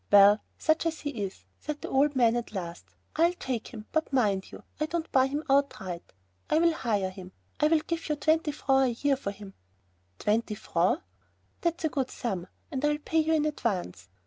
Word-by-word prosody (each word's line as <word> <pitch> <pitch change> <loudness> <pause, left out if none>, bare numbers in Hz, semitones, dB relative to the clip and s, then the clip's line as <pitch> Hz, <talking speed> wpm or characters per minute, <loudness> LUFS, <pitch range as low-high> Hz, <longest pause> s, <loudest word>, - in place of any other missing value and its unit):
"Well, 205 +1 +8 0.2
such 315 +1 +2
as 320 -1 -3
he 290 - -2
is," 200 -7 -5
said 300 -1 -5
the - - -3
old 285 +2 +3
man 235 -2 +4
at 240 -2 -3
last, 175 -3 -5 0.3
"I'll 340 +3 +3
take 255 -8 -3
him, 215 -3 -9
but 315 -2 0
mind 205 -8 +1
you, - - -10 0.2
I 305 - 0
don't 335 0 -3
buy 260 0 +5
him 290 +3 -3
outright. 270 - 0 0.4
I'll 330 +1 +4
hire 205 -10 0
him. 185 -1 -11 0.3
I'll 310 +2 +5
give 335 0 -4
you 300 - +2
twenty 310 +1 +2
francs 270 -4 +2
a 290 - -2
year 280 - +5
for 265 -6 -4
him." 200 -1 -9 0.6
"Twenty 215 - 0
francs!" 205 - +1 0.6
"That's 340 -1 -1
a - - +2
good 265 -3 -1
sum, 190 -8 -3 0.2
and 270 -1 -3
I'll 295 0 +3
pay 320 +2 +1
in 315 -1 +2
advance." 185 - -2
265 Hz, 190 wpm, -28 LUFS, 205-305 Hz, 0.6 s, Well